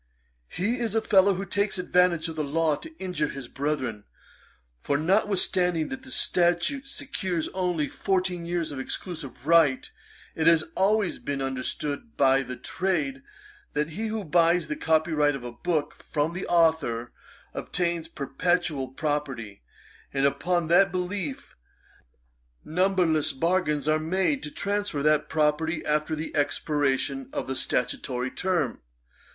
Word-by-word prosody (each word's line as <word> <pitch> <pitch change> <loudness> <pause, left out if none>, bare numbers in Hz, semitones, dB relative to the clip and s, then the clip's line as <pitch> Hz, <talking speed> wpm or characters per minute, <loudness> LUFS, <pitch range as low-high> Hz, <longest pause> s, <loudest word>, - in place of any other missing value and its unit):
'He 225 - -1
is 225 -3 -1
a 225 - +3
fellow 195 -1 +5
who 195 +2 -4
takes 200 +2 0
advantage 180 -2 +2
of 160 - -6
the 155 - -1
law 155 +1 +1
to 320 - -11
injure 180 -5 -1
his 135 -3 -7
brethren; 130 -7 -3 0.8
for, 140 - +1
notwithstanding 180 -1 +2
that 265 0 -5
the 260 - -13
statute 175 +6 +1
secures 190 - -3
only 180 -5 -1
fourteen 185 -3 -1
years 170 -2 -1
of 140 - -5
exclusive 135 -3 -5
right, 160 -5 +4 0.4
it 160 0 0
has 165 -1 +6
always 200 0 +2
been 140 -1 -3
understood 135 - -3
by 135 0 +4
the 125 -1 -6
trade, 150 -6 -2 0.5
that 150 +2 -1
he, 215 +7 -3
who 220 -1 -3
buys 170 0 +3
the 150 - -1
copyright 155 -2 +2
of 135 - -7
a 120 - -5
book 155 +3 -2
from 155 +2 -1
the 180 - -4
authour, 160 -9 +2 0.4
obtains 170 -2 -2
a - - -24
perpetual 165 -1 -1
property; 135 - -3 0.5
and 135 0 +1
upon 175 +4 +1
that 185 +3 +5
belief, 180 -5 -4 1.1
numberless 175 -3 +2
bargains 150 -1 0
are 155 0 +3
made 190 - 0
to - - -5
transfer 200 -4 -2
that 150 0 +3
property 160 +1 +1
after 150 +1 0
the 155 +1 -5
expiration 145 - 0
of 290 -1 -3
the 135 - -3
statutory 125 0 -1
term. 175 -9 -1
160 Hz, 140 wpm, -26 LUFS, 145-185 Hz, 1.1 s, has